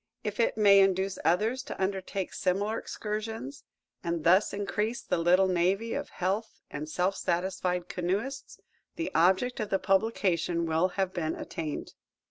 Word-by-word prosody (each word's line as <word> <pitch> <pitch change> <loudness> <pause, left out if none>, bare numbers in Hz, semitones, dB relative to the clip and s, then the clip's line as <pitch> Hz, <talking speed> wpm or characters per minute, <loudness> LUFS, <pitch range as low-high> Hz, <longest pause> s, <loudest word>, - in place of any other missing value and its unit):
If 210 +1 -4
it 230 - +2
may 200 -2 +7
induce 195 0 +2
others 215 +10 +2
to 280 - -8
undertake 190 0 -2
similar 205 +4 0
excursions, 215 - -5 0.4
and 170 -2 -2
thus 185 +5 +4
increase 210 +3 -2
the - - 0
little 180 +3 +4
navy 190 +5 +1
of - - -3
healthy 195 +5 -3
and 150 +1 -5
self 185 +4 0
satisfied 180 0 -1
canoeists, 205 +10 -3 0.4
the 330 -1 -3
object 190 +9 +3
of 215 -2 -2
the 195 - +2
publication 190 -4 +1
will 165 +2 +2
have 190 -1 0
been 160 -2 -2
attained. 155 -3 -5
190 Hz, 145 wpm, -29 LUFS, 175-210 Hz, 0.4 s, may